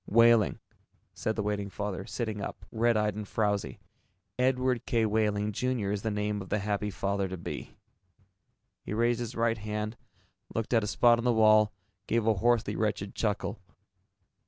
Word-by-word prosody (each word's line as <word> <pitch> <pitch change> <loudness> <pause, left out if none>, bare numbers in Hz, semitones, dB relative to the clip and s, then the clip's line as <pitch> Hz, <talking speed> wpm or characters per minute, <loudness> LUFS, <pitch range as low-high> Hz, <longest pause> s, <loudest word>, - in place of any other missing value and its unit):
"Wehling," 115 -3 +5 0.6
said 110 - -2
the 105 - -1
waiting 100 -1 -2
father, 100 -1 -4
sitting 110 -4 -3
up, 95 -2 -6
red 115 0 +2
eyed 105 -1 +1
and 105 0 -6
frowzy. 105 -2 -1 0.6
"Edward 125 -1 +1
K. 115 -4 +2
Wehling, 105 -1 +1
Jr., 120 -2 -1
is 105 -1 -2
the 110 - -1
name 105 0 -1
of 95 - -9
the - - +1
happy 105 0 -1
father 100 0 -1
to 95 0 -5
be." 85 - -7 1.1
He 105 - -4
raised 120 +1 +2
his 120 -1 -4
right 115 -1 +1
hand, 105 +1 -4 0.6
looked 115 +2 -1
at 115 -2 +4
a - - -2
spot 120 +2 +4
on - - -3
the 125 - +3
wall, 110 -1 +5 0.4
gave 115 -1 +1
a 110 - +4
hoarsely 110 0 +1
wretched 105 -2 -1
chuckle. 105 0 -2
105 Hz, 170 wpm, -29 LUFS, 105-115 Hz, 1.1 s, Wehling